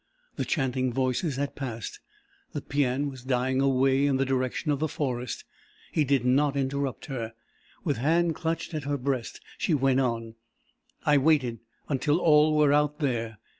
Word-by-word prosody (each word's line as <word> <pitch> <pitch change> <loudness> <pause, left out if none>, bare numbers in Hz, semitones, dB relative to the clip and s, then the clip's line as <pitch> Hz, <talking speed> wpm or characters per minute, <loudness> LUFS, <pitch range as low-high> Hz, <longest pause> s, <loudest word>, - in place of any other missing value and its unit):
The - - -2
chanting 130 -3 0
voices 130 +4 0
had 140 +1 -3
passed. 120 -6 -5 0.5
The - - -3
paean 140 0 0
was 130 -3 -8
dying 130 0 +1
away 135 +1 +3
in 135 -2 +2
the 135 - +1
direction 130 +3 -1
of 140 - 0
the 155 - +1
forest. 125 -5 -3 0.5
He 155 - +2
did 135 -3 +1
not 140 +2 +3
interrupt 135 0 -2
her. 115 -5 -5 0.5
With 145 -6 0
hand 165 +6 +2
clutched 165 +2 -3
at 155 -3 -3
her 145 0 0
breast 130 -3 -3 0.2
she 165 - +2
went 135 -1 +3
on. 115 -3 -1 0.7
"I 145 -2 +5
waited 135 -6 +2 0.3
until 145 +2 +1
all 155 -2 +4
were 150 -1 +5
out 150 0 +2
there. 115 -7 -2
135 Hz, 165 wpm, -27 LUFS, 130-150 Hz, 0.7 s, I